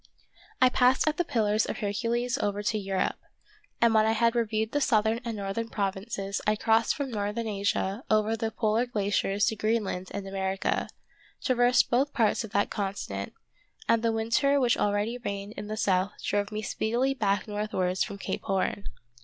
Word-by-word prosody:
I 255 - +6
passed 255 +3 +3
at 310 - +1
the 350 - +2
pillars 220 -8 +1
of - - -3
Hercules 235 +4 -1
over 205 0 -1
to 215 - 0
Europe, 195 -1 -1 0.6
and 235 -1 +4
when 220 0 +4
I 220 - +3
had 230 +1 +3
reviewed 220 -2 0
the 290 - 0
southern 220 -3 +2
and 230 -2 -4
northern 200 +3 -3
provinces 195 0 -3
I 210 - +4
crossed 225 +1 +2
from 275 -3 -3
northern 210 +1 -2
Asia 200 +1 -1
over 215 +1 +3
the 225 0 -2
polar 220 +2 0
glaciers 205 -2 0
to 220 - 0
Greenland 215 -4 -1
and 200 -1 -5
America; 195 0 -1 0.5
traversed 245 -1 +3
both 265 +4 +2
parts 230 -3 +2
of 220 - -7
that 200 0 0
continent, 190 - -4 0.5
and 230 -1 +3
the 230 0 +2
winter 230 +6 +2
which 245 -3 +3
already 205 +4 0
reigned 200 -3 -5
in 210 - -6
the 215 +1 -4
south 190 -1 +1
drove 205 0 0
me 215 0 -4
speedily 240 +6 0
back 205 -6 0
northwards 205 -3 -1
from 200 -2 -6
Cape - - -4
Horn. 195 +1 -1
215 Hz, 175 wpm, -28 LUFS, 200-235 Hz, 0.6 s, I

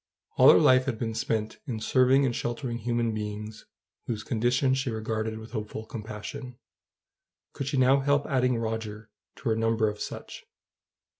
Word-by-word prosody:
All - - +7
her - - +6
life 130 0 +5
had 130 -5 -2
been 115 -1 -3
spent 110 -1 -2
in 115 -5 -3
serving 130 +4 +4
and 120 -3 0
sheltering 120 0 -3
human 120 0 0
beings 105 0 -6 0.4
whose 110 -3 -3
condition 125 +4 +1
she 135 0 -1
regarded 110 0 -3
with 110 +1 -10
hopeful 110 -1 -5
compassion: 110 +4 -7 1.0
could 140 - -4
she 140 - -1
now 130 +2 +5
help 140 +1 +2
adding 125 -3 +1
Roger 110 -1 -4 0.2
to - - -3
her 110 - +2
number 115 0 +1
of 105 0 -4
such? - - -7
115 Hz, 160 wpm, -27 LUFS, 110-130 Hz, 1.0 s, All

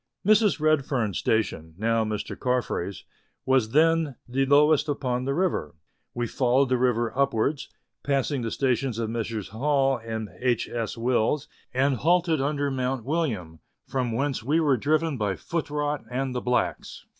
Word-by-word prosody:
Mrs. 215 -3 +4
Redfern's 135 - +1
station 80 -8 -1
(now 115 +2 +1
Mr. 105 -1 -4
Carfrae's) 120 -7 -2 0.4
was 130 -4 +3
then 160 +1 +3
the 135 +2 0
lowest 150 +1 +4
upon 130 -3 -1
the 140 +1 -1
river; 165 - -1 0.4
we 120 0 -1
followed 130 +3 +2
the 130 - +2
river 120 -1 +1
upwards, 140 +1 0 0.3
passing 140 -1 0
the 115 - -2
stations 130 -1 0
of 115 -1 -2
Messrs. 110 -4 -3
Hall 135 +3 +1
and 110 -2 -4
H. 125 -2 +1
S. 115 -1 -4
Wills, 120 +4 +1 0.2
and 130 +1 +1
halted 170 +1 +2
under 145 0 0
Mount 130 -2 -2
William, 115 - -2 0.3
from 130 -3 -1
whence 135 +4 -1
we 145 +8 +1
were 145 -4 +3
driven 155 +4 0
by 100 -3 0
foot 165 - -4
rot 150 0 -2
and 130 +1 -2
the 125 - -2
blacks. 125 0 -2
130 Hz, 155 wpm, -26 LUFS, 115-145 Hz, 0.4 s, Mrs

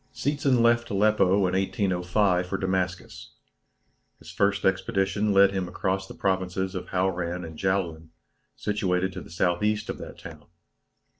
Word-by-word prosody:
Seetzen 135 -1 +1
left 120 0 +3
Aleppo 105 0 +3 0.2
in 90 - 0
1805 95 -1 +1
for 95 - -2
Damascus. 95 -1 -3 0.8
His - - -12
first 100 0 +1
expedition 95 +2 +1
led 100 0 +6
him 95 -2 -2
across 95 +1 -2
the - - -10
provinces 95 -1 -1
of 95 - -5
Hauran 90 -2 -1
and 80 -1 -9
Jaulan, 85 -4 -2 0.5
situated 95 -3 -1
to 95 - -6
the - - -12
S.E. 95 +5 0
of - - -9
that - - -9
town. 75 -3 -11
95 Hz, 140 wpm, -26 LUFS, 90-100 Hz, 0.8 s, led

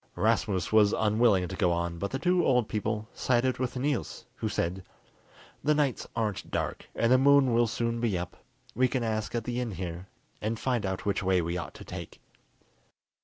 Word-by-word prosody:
Rasmus 95 0 +1
was 105 -1 +5
unwilling 105 -4 +3
to 95 - -6
go 90 -3 +2
on, 85 0 -2
but 100 - -2
the 135 - -2
two 180 +4 +2
old 125 -4 +3
people 110 0 -2
sided 130 0 +1
with 130 0 -2
Niels, 135 -3 -2
who 110 - -2
said, 90 0 -2 0.8
"The 150 +1 +3
nights 145 -4 0
aren't 110 -4 -2
dark, - - -3
and 115 +1 +2
the 130 - +6
moon 140 -2 +5
will 120 0 +4
soon 115 +1 -2
be 110 -6 +1
up. 90 0 -5 0.4
We 130 0 +3
can 130 -2 -1
ask 110 0 -2
at 115 - -1
the 120 +1 -3
inn 115 -4 -3
here, 90 0 -5 0.3
and 110 +1 -2
find 120 -5 0
out 95 -1 -4
which 100 - 0
way 95 -1 +2
we 85 0 -2
ought 85 -3 -5
to - - -10
take." - - -8
110 Hz, 195 wpm, -29 LUFS, 95-125 Hz, 0.8 s, the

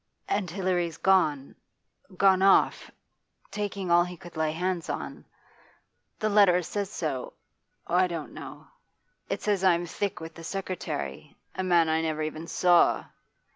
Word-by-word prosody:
And 200 -3 -1
Hilary's 175 -3 -1
gone 150 -8 +2 0.6
gone 190 -1 +4
off 195 0 +4 0.6
taking 200 -3 -3
all 175 0 +6
he 180 0 -7
could 175 +1 -13
lay 160 -1 0
hands 175 +1 -2
on. - - -5 0.9
The 215 - -1
letter 200 -4 +5
says 200 +3 -3
so 150 -10 -4 0.5
I 180 +2 +3
don't 165 -4 -6
know. - - -10 0.6
It - - -3
says 205 -3 0
I'm 175 -2 +3
thick 200 +3 -3
with 160 0 -8
the 165 - -11
secretary 165 - -5 0.2
a - - -3
man 175 -3 +4
I 160 0 +1
never 155 -1 -2
even 155 +1 -5
saw. 175 0 +3
175 Hz, 140 wpm, -27 LUFS, 160-190 Hz, 0.9 s, all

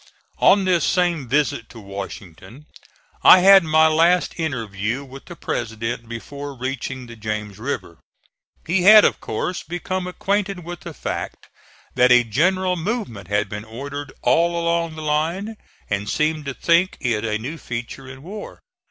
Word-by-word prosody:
On 200 -1 +5
this 180 -3 +2
same 175 -6 +1
visit 130 -3 0
to 115 - -12
Washington 100 - -9 0.6
I 185 - +8
had 195 0 +8
my 160 0 +4
last 165 +3 +3
interview 115 -5 -3
with 135 0 -12
the 175 - -10
President 115 -3 -4
before 140 +4 -7
reaching 130 0 -4
the 115 -1 -11
James 105 -2 -5
River. 110 - -5 0.7
He 175 +3 +1
had 210 +3 +9
of - - +1
course 175 +11 -3
become 180 +2 -4
acquainted 195 0 -2
with 175 +1 -7
the - - -9
fact - - -5 0.5
that 125 0 +4
a 125 -1 +7
general 180 - +1
movement 170 - -4
had 105 +1 0
been 105 +1 -6
ordered 140 +5 -7
all 170 +1 +2
along 170 -1 0
the 155 - -7
line, 165 +8 -1 0.3
and 105 0 -2
seemed 155 0 0
to 140 -1 -4
think 175 +2 +2
it 115 -4 -1
a 105 -2 -1
new 140 +9 -6
feature 120 +3 -6
in 130 +1 -11
war. 205 +5 -8
145 Hz, 155 wpm, -21 LUFS, 115-175 Hz, 0.7 s, had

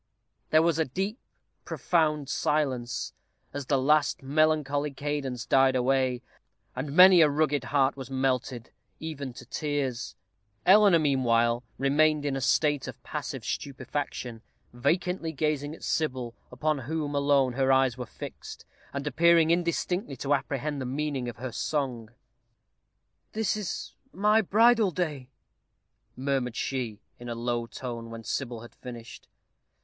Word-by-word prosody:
There 155 +1 +5
was 165 -1 +2
a 160 - +3
deep, 195 - -3 0.4
profound 155 -4 0
silence 130 -6 -1 0.4
as 140 -2 -5
the 140 - +3
last 145 +1 +2
melancholy 150 0 +1
cadence 135 -4 -3
died 135 -1 +4
away, 130 -1 +1 0.5
and 140 +3 -4
many 185 -1 +9
a 155 - +6
rugged 145 -1 +1
heart 140 -1 +2
was 135 -2 -8
melted, 130 -2 -1 0.3
even 145 -4 -5
to - - -11
tears. 145 -5 -3 0.5
Eleanor, 200 -2 +7
meanwhile, 120 -5 +2
remained 150 +2 +2
in 140 -2 0
a 135 - -3
state 145 +2 +2
of - - -9
passive 140 -5 -5
stupefaction, 130 -4 -4 0.3
vacantly 170 +6 0
gazing 150 0 -1
at - - -16
Sybil, 130 -7 -1 0.2
upon 150 +4 -1
whom 145 +3 -3
alone 140 -3 +3
her 135 +1 +2
eyes 130 -2 +3
were 125 -2 -6
fixed, - - -9 0.3
and 140 +1 -4
appearing 165 +1 +4
indistinctly 170 -1 0
to 140 +3 0
apprehend 140 +1 -2
the - - -3
meaning 135 -2 -2
of 120 - -9
her 125 +1 -5
song. 125 -4 -2 1.2
"This 215 -4 0
is 210 -5 -5 0.2
my 210 +2 +3
bridal 225 +1 +4
day," 150 -7 -3 0.9
murmured 130 -2 -1
she, 120 -6 -3 0.2
in 120 0 -8
a 120 - -3
low 120 0 -2
tone, 115 -2 -6
when 115 0 -8
Sybil 120 0 -3
had 120 - -12
finished. 120 -2 -10
140 Hz, 135 wpm, -28 LUFS, 125-155 Hz, 1.2 s, many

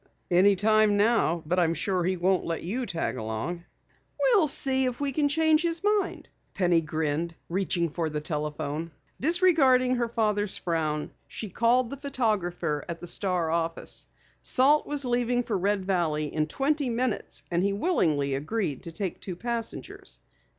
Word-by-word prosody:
"Any 190 +3 +5
time 215 +1 +3
now. 205 -6 +2
But 180 +4 +1
I'm 165 -1 +2
sure 185 +2 0
he 185 +1 0
won't 185 +1 +2
let 165 -1 -3
you 235 +8 -3
tag 165 -7 -2
along." 110 +11 -4 0.5
"We'll 440 -10 +4
see 265 -1 +1
if 250 -1 -2
we 285 -1 -1
can 290 +1 +1
change 315 +1 +3
his 335 +1 -1
mind," 415 -2 0 0.3
Penny 175 -3 +3
grinned, 160 +1 -2
reaching 175 -1 0
for 165 +1 -2
the 150 0 -3
telephone. 150 +1 -3 0.3
Disregarding 275 -6 +4
her 235 -1 0
father's 210 -3 0
frown, 155 -3 -2 0.2
she 215 - -6
called 235 +4 +2
the 280 - -5
photographer 210 - -1
at 170 0 -4
the - - -8
Star 175 -2 -1
office. 165 0 -2 0.3
Salt 285 +4 +3
was 290 -2 +1
leaving 245 0 +1
for 225 - -2
Red 195 +1 0
Valley 160 -6 0
in 155 -1 0
twenty 280 - 0
minutes, 235 -1 -2
and 170 0 +1
he 200 +1 +1
willingly 165 - +1
agreed 150 - -2
to 170 - -8
take 185 +2 -4
two 185 - -5
passengers. 235 +3 -5
195 Hz, 160 wpm, -27 LUFS, 165-255 Hz, 0.5 s, Any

